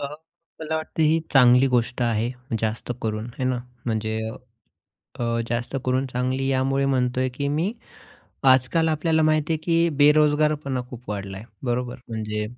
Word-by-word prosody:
अ, 140 - -2 0.5
मला 160 0 -2
वाटतं 160 0 -2
ही 160 +1 +3
चांगली 125 -1 +6
गोष्ट 125 0 0
आहे, 115 0 +1 0.3
जास्त 110 +2 -2
करून 110 -1 -2
आहे 120 +2 -5
ना. 130 -1 0 0.3
म्हणजे 110 -1 -1 1.0
अ, - - 0 0.2
जास्त 120 +3 -2
करून 130 +1 +1
चांगली 130 +1 -2
अ, - - +1
यामुळे 135 +1 +1
म्हणतोय, 130 -1 +1
की 140 +3 -3
मी 160 +8 0 0.8
आजकाल 130 +6 +3
आपल्याला 160 +1 +1
माहिती 155 +1 +2
आहे, - - 0
की 170 0 +3
बेरोजगारपणा 150 -2 +3
खूप 125 -2 -10
वाढला 100 -2 -4
आहे. 105 - -10 0.2
बरोबर? 125 0 -1
म्हणजे, 105 -1 -3
130 Hz, 155 wpm, -24 LUFS, 120-150 Hz, 1.0 s, चांगली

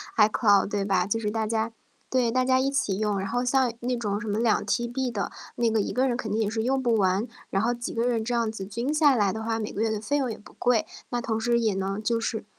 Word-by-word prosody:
iCloud 210 -2 +4
对 205 -1 -1
吧？ 190 -2 +1
就 225 +3 0
是 210 -2 -2
大 220 0 -1
家 225 +1 -1 0.4
对， 250 -3 +2
大 255 +1 +2
家 260 0 +3
一 265 +1 +1
起 245 -9 0
用。 210 -2 0
然 195 - -3
后 245 +4 -1
像 255 -1 +2
那 245 +1 -1
种 205 -3 -2
什 235 - -6
么 205 0 -1
2 230 -2 +2
TB 240 +4 -1
的， 205 -3 -3 0.2
那 235 -1 +1
个 220 -1 +2
一 - - -3
个 260 +2 +2
人 245 - 0
肯 225 -4 -4
定 215 - 0
也 220 - +1
是 220 +2 -1
用 265 +3 0
不 240 -2 +2
完， 195 +2 +2 0.2
然 195 +2 0
后 240 +2 +2
几 240 0 -5
个 230 +1 0
人 230 -3 0
这 235 - -3
样 230 -2 +1
子 220 -3 -6
均 235 +9 -2
下 300 -3 +5
来 205 -5 +2
的 220 - -4
话， 225 0 -1
每 215 - -4
个 210 - -3
月 225 - +2
的 215 -1 -1
费 280 +7 -1
用 260 -4 0
也 - - -6
不 - - -16
贵。 245 -3 +2 0.2
那 245 - -1
同 225 -2 -2
时 235 +1 +2
也 220 -3 +1
能 195 +2 -2
就 230 +1 +1
是 225 -2 -3
225 Hz, 330 characters per minute, -26 LUFS, 210-245 Hz, 0.4 s, 下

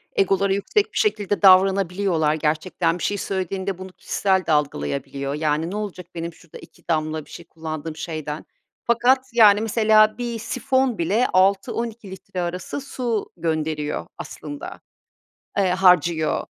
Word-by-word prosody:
egoları 195 0 +2
yüksek 300 - 0
bir - - -4
şekilde 205 - 0
davranabiliyorlar 190 -4 +4
gerçekten. 165 +2 0
Bir - - -5
şey 205 - 0
söylediğinde 190 0 -3
bunu 185 0 -8
kişisel 190 0 0
de - - -1
algılayabiliyor. 140 - -1
Yani, 155 +2 -1
ne - - -4
olacak 200 -4 -5
benim 170 0 -4
şurada 165 0 -14
2 - - -17
damla 155 -2 -1
bir - - -21
şey 170 - -10
kullandığım 160 -1 -6
şeyden. 155 -2 -5 0.4
Fakat, 245 +3 +3
yani, 210 -3 +6
mesela 215 -1 +4
bir 240 -2 -4
sifon 260 +1 0
bile 200 +9 +1
6-12 210 +2 +1
litre 185 -1 -6
arası 180 +10 -4
su 240 -5 -3
gönderiyor 155 -2 -2
aslında, 290 0 -8 0.8
eee, 190 -2 +3
harcıyor. 180 -3 +3
185 Hz, 135 wpm, -22 LUFS, 160-215 Hz, 0.8 s, yani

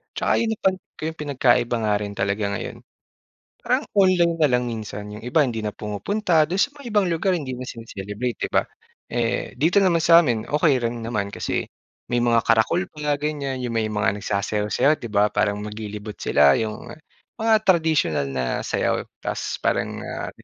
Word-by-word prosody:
'Tsaka - - 0
'yun 230 - 0
napansin 190 -3 -2
ko - - -14
'yong 160 - -11
pinagkaiba 130 -5 +2
nga 105 - +3
rin 105 -1 -5
talaga 100 +2 -1
ngayon, - - -6 0.9
parang - - +1
online 185 -4 +4
na 150 - +5
lang 125 0 +2
minsan. 110 -3 -5
'Yong 105 - -9
iba 145 +6 +2
hindi 115 -3 -3
na 105 - -2
pumupunta, 160 - 0
do'n 185 +3 -2
sa 285 +8 +2
may 245 -4 -7
ibang 205 -3 +3
lugar 175 +2 +1
hindi 135 -6 -4
na 125 - -7
sine-celebrate, 115 +1 -5
'di - - -14
ba. - - +2 0.5
Eh, 120 -1 -1
dito 165 +8 +3
naman 180 -3 +3
sa 170 +1 +7
amin 115 -7 -1
okey 150 -2 +3
rin 115 0 -4
naman 105 -3 -2
kasi - - -2 0.5
may - - +3
mga 115 -1 +3
karakol 115 +11 +3
pa 150 -1 0
ganyan 145 -3 -3
'yong 120 - -2
may 110 -1 +1
mga 105 -1 0
nagsasayaw-sayaw, 105 +8 +1
'di - - -7
ba, 105 0 +3
parang 105 0 0
maglilibot 105 0 -7
sila. 70 0 +4
'Yong 110 -1 -4 0.5
mga 225 0 +3
tradisyonal 160 - +2
na 65 -1 -2 0.2
sayaw - - 0 0.2
tas - - -3
parang, - - 0
ah, - - -5
120 Hz, 180 wpm, -23 LUFS, 105-160 Hz, 0.9 s, sa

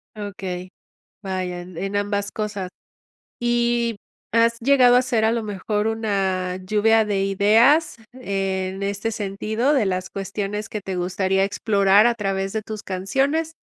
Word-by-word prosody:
Okey, 190 -3 -6 0.5
vaya, 185 -2 -3
en 185 +3 -5
ambas 205 0 -1
cosas, 205 -3 -4 0.7
y, 240 -1 +1 0.4
¿has 230 +1 +3
llegado 250 -1 +5
a - - +6
hacer 240 -3 0
a 220 - +3
lo 230 -1 -1
mejor 210 +1 -2
una 195 -5 -1
lluvia 215 +3 +3
de 200 -2 0
ideas 225 +12 +4 0.2
en 195 -5 -3
este 200 +3 -2
sentido 215 +6 -1
de 260 -6 +3
las 185 -1 -2
cuestiones 200 +2 -4
que 210 - -5
te 190 -1 -5
gustaría 190 +2 0
explorar 200 0 +3
a 240 - +3
través 195 -3 -2
de 220 - -2
tus 215 0 -7
canciones? 275 - -1
205 Hz, 140 wpm, -22 LUFS, 195-225 Hz, 0.7 s, a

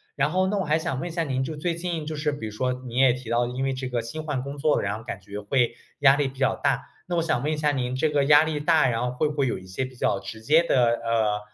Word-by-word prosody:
然 140 +2 +1
后 185 +2 +2
那 205 +2 0
我 195 - 0
还 155 0 +1
想 160 -4 -3
问 175 - -4
一 - - -6
下 165 0 -1
您， 130 -2 -1
就 155 +3 -5
最 170 +2 -1
近 170 -2 -3
就 155 +1 -4
是 150 0 0
比 145 -6 -6
如 105 - -8
说 125 +4 0
你 120 -1 -7
也 130 -1 +6
提 125 -1 -6
到， 120 +1 +2
因 125 +2 -3
为 135 - 0
这 130 0 -4
个 120 -2 -1
新 155 +7 -6
换 145 -4 -2
工 140 +2 -6
作， 150 +1 +2
然 100 +1 -2
后 110 - -11
感 105 -5 -6
觉 100 +2 -8
会 120 +2 +1 0.2
压 135 -1 +6
力 145 -2 0
比 135 0 -15
较 135 -1 +2
大。 135 - 0 0.2
那 175 -1 -1
我 - - +3
想 160 -7 0
问 150 - 0
一 155 - -1
下 150 -1 +2
您 125 -2 -2
这 140 +4 +1
个 145 -1 +2
压 145 +2 +7
力 155 -2 -2
大， 155 -2 +4
然 115 -2 0
后 125 - -1
会 125 +5 0
不 150 - -4
会 140 -2 +1
有 120 - -2
一 95 - -14
些 95 +8 -3
比 130 0 -7
较 100 -4 +1
直 110 - -8
接 155 +9 +4
的， 130 -7 +3 0.2
呃 110 -2 +1
135 Hz, 345 characters per minute, -25 LUFS, 120-155 Hz, 0.2 s, 压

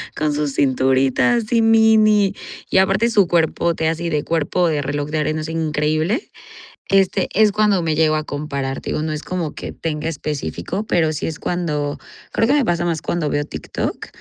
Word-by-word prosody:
con 155 -1 0
sus 145 -1 -2
cinturitas 135 - +2
y 230 - +4
mini, 220 -2 +4 0.4
y - - +2
aparte 195 +5 +3
su 205 -5 +3
cuerpote 165 -1 +1
así 165 +1 -2
de 150 -2 -1
cuerpo 165 +2 0
de 150 -2 0
reloj 145 +1 -3
de 155 - -2
arena 155 +1 -1
así 155 +1 -5
increíble, 155 - -1 0.6
este 195 -1 +2
es 215 0 +4
cuando 210 -3 +2
me 160 -1 0
llego 155 -1 +3
a 155 - -1
comparar. 140 -3 -4
Te - - -6
digo, 155 - -1
no 155 - -2
es 155 -1 -4
como 175 -4 -4
que - - -7
tenga 155 -1 -4
específico, 150 - -4
pero 160 -2 +2
sí - - -3
es 160 - -4
cuando 150 -5 -2 0.3
creo 225 - +2
que 275 - +3
me 285 -4 +2
pasa 175 -2 0
más 165 -2 -2
cuando 165 -4 -1
veo 145 - 0
TikTok. 80 - -5
160 Hz, 190 wpm, -20 LUFS, 150-190 Hz, 0.6 s, y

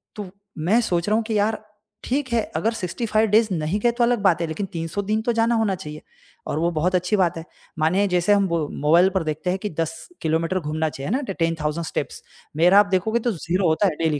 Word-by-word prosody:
तो 205 -3 -6 0.3
मैं 185 +10 +2
सोच 175 -3 -1
रहा 215 - +3
हूँ 225 - +1
कि 220 -2 -1
यार 215 +1 0 0.4
ठीक 265 +1 -1
है 230 - +3 0.2
अगर 225 +8 0
65 220 +2 0
डेज़ 220 +1 +4
नहीं 165 +5 -1
गए 240 - +3
तो 240 0 0
अलग 240 -1 +2
बात 175 -4 +3
है 165 - -1
लेक़िन 195 +5 -3
300 165 +4 -3
दिन 215 +2 0
तो 240 - +1
जाना 230 +1 +2
होना 215 -4 +1
चाहिए 150 -4 -9 0.5
और 150 - -2
वो 170 +1 +1
बहुत 175 +4 0
अच्छी 180 +4 +1
बात 175 -3 +1
है। 165 - -6 0.4
मानिए 185 +6 +2
जैसे 180 +3 +3
हम 200 -1 +3 0.4
मोबाइल 170 +5 +5
पर 185 - +1
देखते 155 +3 -3
हैं 190 - -2
कि 210 - -4
10 165 0 -2 0.3
किलोमीटर 165 +3 0
घूमना 155 0 -2
चाहिए 140 +3 -6
ना 265 +4 +1
10,000 165 -2 -2
स्टेप्स - - -4 0.3
मेरा 180 +5 +6
आप 205 - +5
देखोगे 220 +6 0
तो 240 - 0
0 180 +1 -1
होता 175 +6 +2
है 160 - -1
डेली 150 -3 +1
185 Hz, 230 wpm, -22 LUFS, 165-215 Hz, 0.5 s, मेरा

